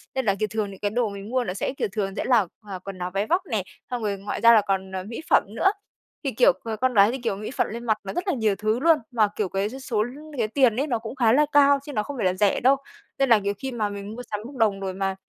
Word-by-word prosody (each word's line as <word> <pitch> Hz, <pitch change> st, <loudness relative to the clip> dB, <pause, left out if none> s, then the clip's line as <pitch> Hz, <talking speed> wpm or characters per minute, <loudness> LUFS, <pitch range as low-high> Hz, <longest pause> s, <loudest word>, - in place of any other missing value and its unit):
Nên 265 Hz, -2 st, -1 dB
là, 195 Hz, -1 st, +2 dB
kiểu, 215 Hz, -, +1 dB
thường 215 Hz, -2 st, -2 dB
những 195 Hz, -, -11 dB
cái 205 Hz, 0 st, -1 dB
đồ 235 Hz, -2 st, 0 dB
mình 200 Hz, +1 st, -8 dB
mua 255 Hz, 0 st, +1 dB
nó 180 Hz, -, -3 dB
sẽ, 200 Hz, -, -2 dB
kiểu, -, -, 0 dB
thường 195 Hz, -2 st, -2 dB
sẽ -, -, -2 dB
là 235 Hz, -7 st, +4 dB, 0.2 s
là 190 Hz, -2 st, -5 dB
quần 195 Hz, 0 st, -8 dB
áo 180 Hz, 0 st, -4 dB
váy 200 Hz, +2 st, -1 dB
vóc 355 Hz, +3 st, +2 dB
nè. 220 Hz, -, -1 dB, 0.3 s
Xong 245 Hz, -3 st, -3 dB
rồi 200 Hz, -1 st, -1 dB
ngoài 200 Hz, +2 st, -5 dB
ra 235 Hz, 0 st, +8 dB
là 215 Hz, -, +6 dB
còn, 190 Hz, -1 st, -2 dB
ờ, 185 Hz, -1 st, -4 dB
mỹ 230 Hz, +8 st, -7 dB
phẩm -, -, +5 dB
nữa. 385 Hz, -, +4 dB, 0.5 s
Thì, -, -, -1 dB
kiểu, -, -, +5 dB
ờ, 225 Hz, -1 st, -3 dB
con 255 Hz, +3 st, 0 dB
gái 205 Hz, +1 st, +6 dB
thì, 265 Hz, -, -3 dB
kiểu, 235 Hz, -6 st, -2 dB
mỹ 210 Hz, +4 st, -6 dB
phẩm -, -, 0 dB
lên 235 Hz, +2 st, -6 dB
mặt 220 Hz, -2 st, +2 dB
nó 195 Hz, -, -5 dB
rất 355 Hz, +3 st, -3 dB
là 370 Hz, -, +2 dB
nhiều 220 Hz, -5 st, +1 dB
thứ 215 Hz, +4 st, 0 dB
luôn. 325 Hz, +1 st, +5 dB
Mà, 220 Hz, -3 st, +3 dB
kiểu, 205 Hz, -4 st, -1 dB
cái 195 Hz, +2 st, -1 dB
số 245 Hz, -4 st, -2 dB, 0.3 s
cái 225 Hz, -2 st, +1 dB
tiền 240 Hz, -1 st, +3 dB
ấy, 280 Hz, +4 st, 0 dB
nó 235 Hz, -4 st, 0 dB
cũng 225 Hz, +4 st, -7 dB
khá 235 Hz, -4 st, +3 dB
là 300 Hz, +2 st, +5 dB
cao 280 Hz, -1 st, +5 dB
chứ 290 Hz, -, -7 dB
nó 210 Hz, -, 0 dB
không 280 Hz, +3 st, -7 dB
phải 205 Hz, -, -1 dB
là 185 Hz, -, +3 dB
rẻ 200 Hz, +1 st, +2 dB
đâu. 265 Hz, +3 st, +5 dB, 0.4 s
Nên 270 Hz, -2 st, +2 dB
là, 225 Hz, -, +7 dB
nhiều 200 Hz, 0 st, -1 dB
khi 265 Hz, +3 st, -5 dB
mà 215 Hz, -4 st, -1 dB
mình 205 Hz, +2 st, -7 dB
mua 245 Hz, -, -7 dB
sắm 210 Hz, -, -2 dB
bốc 275 Hz, +2 st, -9 dB
đồng 210 Hz, -5 st, +2 dB
rồi 190 Hz, -1 st, -3 dB
mà 195 Hz, 0 st, -2 dB
220 Hz, 310 wpm, -24 LUFS, 200-250 Hz, 0.5 s, ra